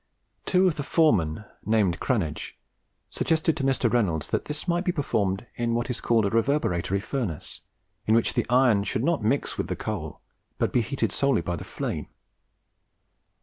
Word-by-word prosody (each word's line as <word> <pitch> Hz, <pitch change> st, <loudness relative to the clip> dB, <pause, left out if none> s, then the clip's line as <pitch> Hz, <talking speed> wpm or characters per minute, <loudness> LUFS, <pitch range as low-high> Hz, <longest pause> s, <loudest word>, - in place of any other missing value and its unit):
Two 185 Hz, 0 st, +4 dB
of 170 Hz, -, 0 dB
the -, -, -1 dB
foremen, 105 Hz, -, +2 dB, 0.2 s
named 105 Hz, -5 st, +2 dB
Cranege, 90 Hz, -12 st, -2 dB, 0.6 s
suggested 160 Hz, -1 st, +1 dB
to 150 Hz, -, -3 dB
Mr. 135 Hz, -1 st, +2 dB
Reynolds 90 Hz, -, 0 dB
that -, -, -1 dB
this 150 Hz, +4 st, -4 dB
might 175 Hz, 0 st, +1 dB
be 185 Hz, -, +1 dB
performed 105 Hz, -, -1 dB
in 115 Hz, -1 st, -1 dB
what 120 Hz, +2 st, -1 dB
is 120 Hz, -, -4 dB
called 115 Hz, -3 st, +2 dB
a 100 Hz, -, 0 dB
reverberatory 110 Hz, -, +1 dB
furnace, 100 Hz, -, -4 dB, 0.5 s
in 110 Hz, -, +5 dB
which 115 Hz, -, +2 dB
the -, -, 0 dB
iron 125 Hz, -5 st, +4 dB
should 110 Hz, +4 st, -1 dB
not 165 Hz, -9 st, +1 dB
mix 125 Hz, +7 st, 0 dB
with -, -, -1 dB
the -, -, -2 dB
coal, -, -, -5 dB, 0.4 s
but -, -, 0 dB
be 125 Hz, -, +4 dB
heated 135 Hz, +5 st, -1 dB
solely 140 Hz, -9 st, +2 dB
by 85 Hz, +1 st, -2 dB
the -, -, -7 dB
flame. -, -, -4 dB
120 Hz, 175 wpm, -26 LUFS, 100-145 Hz, 0.6 s, in